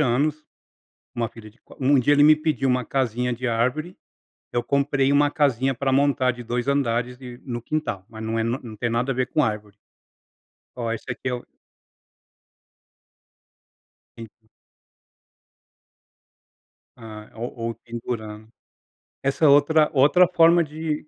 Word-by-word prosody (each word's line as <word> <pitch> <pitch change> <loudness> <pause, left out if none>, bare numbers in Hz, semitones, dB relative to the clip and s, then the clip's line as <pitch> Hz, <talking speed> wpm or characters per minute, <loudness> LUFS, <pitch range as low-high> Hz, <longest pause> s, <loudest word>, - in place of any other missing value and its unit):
anos, 150 +4 0 0.7
uma 115 -1 -1
filha 110 -1 -13
de 115 - -30
qua - - -18
um 135 +2 +4
dia 145 +4 +3
ele 145 - +4
me 155 +1 +8
pediu 155 -3 -1
uma 125 0 +1
casinha 125 -2 -1
de 125 +2 -5
árvore, 125 +9 -1 0.6
eu 120 - 0
comprei 140 -1 +1
uma 145 +1 +4
casinha 135 -3 +1
pra 135 +2 -1
montar 135 -1 +2
de 120 0 -10
2 120 +2 -3
andares 125 -2 -1
e 125 -2 -9
no 120 -2 -4
quintal, 120 -8 -3
mas 110 -1 -9
não 110 +1 -2
é - - +1
não 115 +3 -1
não 115 -3 -9
tem 120 +3 -1
nada 120 +3 0
a - - -3
ver 130 0 0
com 150 +3 +1
árvore. 105 -3 -3 1.0
Ó, 120 -2 -3
esse 115 - -6
aqui 120 +2 -4
é 125 - -1
o 120 - -7 2.7
En 115 -1 -8 2.7
Ah, 110 -2 -11
ou 120 +2 -4 0.2
ou 115 - -4
pendurando. 110 -2 -7 0.7
Essa 140 +3 +1
é - - +7
outra 150 +2 +5
outra 145 +6 +5
forma 170 -1 +5
de 155 0 -5
125 Hz, 150 wpm, -23 LUFS, 115-145 Hz, 2.7 s, me